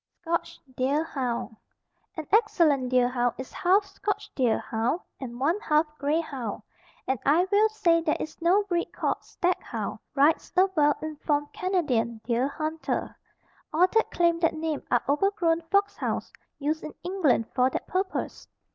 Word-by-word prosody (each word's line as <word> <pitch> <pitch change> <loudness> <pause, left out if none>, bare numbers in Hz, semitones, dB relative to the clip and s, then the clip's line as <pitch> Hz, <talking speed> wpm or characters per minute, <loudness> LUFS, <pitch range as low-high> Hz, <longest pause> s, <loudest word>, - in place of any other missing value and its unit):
SCOTCH 335 0 -2 0.2
DEER 275 +5 +1
HOUND. 250 -7 -3 0.6
An 315 - -4
excellent 330 - +3
deer 250 -1 +4
hound 245 -1 0
is 260 - -8
half 385 +3 +3
scotch 400 +1 -4
deer 245 -5 +2
hound 230 +9 -1 0.2
and 245 -2 -7
one 325 +9 +1
half 305 -5 +2
grey 290 +3 +1
hound, 260 -10 -5 0.4
and 265 -2 -1
I 320 +6 +4
will 425 +2 +5
say 345 -6 +2
there 320 -2 0
is 310 - -6
no 365 +5 +4
breed 350 -4 -2
called - - -1
stag 360 0 -1
hound, - - -5 0.2
writes 290 +3 +3
a 370 - +7
well 295 -2 +4
informed 295 -1 -2
Canadian 260 - 0
deer 240 +3 +1
hunter. 310 +2 -3 0.6
All 340 +4 +5
that 450 +4 +1
claim 340 -1 +2
that 330 -1 +2
name 315 -2 -2
are 240 - +2
overgrown 330 +2 +2
fox 400 +2 +2
hounds - - -3 0.2
used 305 +2 -2
in 305 - -7
England 345 -11 +2
for 255 0 +3
that - - -4
purpose. 375 +2 -3
310 Hz, 160 wpm, -27 LUFS, 260-355 Hz, 0.6 s, a